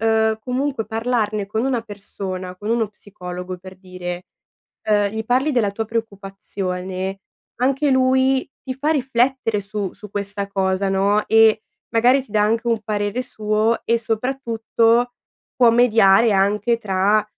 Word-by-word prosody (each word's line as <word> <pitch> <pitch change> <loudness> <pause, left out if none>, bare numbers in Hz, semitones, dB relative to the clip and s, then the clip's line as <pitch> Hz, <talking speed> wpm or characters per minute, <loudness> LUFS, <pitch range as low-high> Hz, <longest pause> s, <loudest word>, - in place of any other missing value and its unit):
uhm, 220 0 +2
comunque 255 -2 -2
parlarne 220 -2 -1
con 220 +4 -2
una 255 -3 0
persona, 195 -3 -7
con 210 +3 -7
uno 230 -2 +1
psicologo, 180 -3 -8
per 185 +1 -12
dire 180 -1 -7 0.6
uhm, 205 -1 +3
gli 220 +1 -4
parli 260 +6 +2
della 235 -6 +2
tua 225 +2 -3
preoccupazione, 195 -3 -4 0.4
anche 270 +3 +1
lui 260 +1 +2
ti 260 - -4
fa 285 +4 -2
riflettere 255 -5 +1
su 200 -1 -4
su 210 - -12
questa 200 0 -4
cosa, 195 0 0
no, 200 +2 +2
e 220 -1 +5 0.3
magari 250 +3 +3
ti 215 - -20
dà 210 -1 +2
anche 225 +3 +1
un 230 -2 +1
parere 205 +3 -1
suo 215 0 0
e, 235 0 +2
soprattutto, 230 0 0 0.4
può 245 -2 +5
mediare 225 -2 +5
anche 205 +4 +2
tra 205 +1 +2
220 Hz, 140 wpm, -21 LUFS, 195-240 Hz, 0.6 s, e